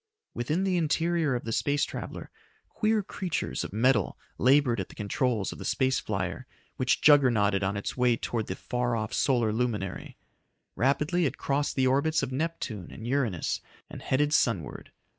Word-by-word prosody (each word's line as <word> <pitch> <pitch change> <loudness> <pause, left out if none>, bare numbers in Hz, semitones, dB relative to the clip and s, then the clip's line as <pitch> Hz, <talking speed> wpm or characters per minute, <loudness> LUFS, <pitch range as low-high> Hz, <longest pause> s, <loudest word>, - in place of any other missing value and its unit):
Within 155 +10 -1
the 190 -2 +1
interior 165 -2 +1
of 120 - -3
the 115 - -4
space 145 +5 +1
traveler, - - -7 0.4
queer 215 -1 +1
creatures 185 -2 -3
of - - -6
metal 110 0 +2 0.2
labored 130 -3 +4
at 95 - -4
the - - -14
controls 105 0 -1
of - - -9
the - - -6
space 130 0 +1
flyer 95 +4 -3 0.3
which 130 -2 +1
juggernauted 120 -9 +5
on 100 +1 -1
its 100 - -4
way 125 -2 +3
towards 115 -2 -3
the 95 - -3
far 125 +2 -2
off 110 -1 -3
solar 120 -5 +2
luminary. 110 -5 -3 0.6
Rapidly 150 +6 +2
it - - -5
crossed 140 +1 -1
the 130 - +2
orbits 140 +5 +2
of - - -3
Neptune 130 - -3
and 110 - -9
Uranus 120 - -1 0.3
and - - -8
headed 145 +3 +1
sunward. 105 - 0
125 Hz, 165 wpm, -28 LUFS, 110-145 Hz, 0.6 s, juggernauted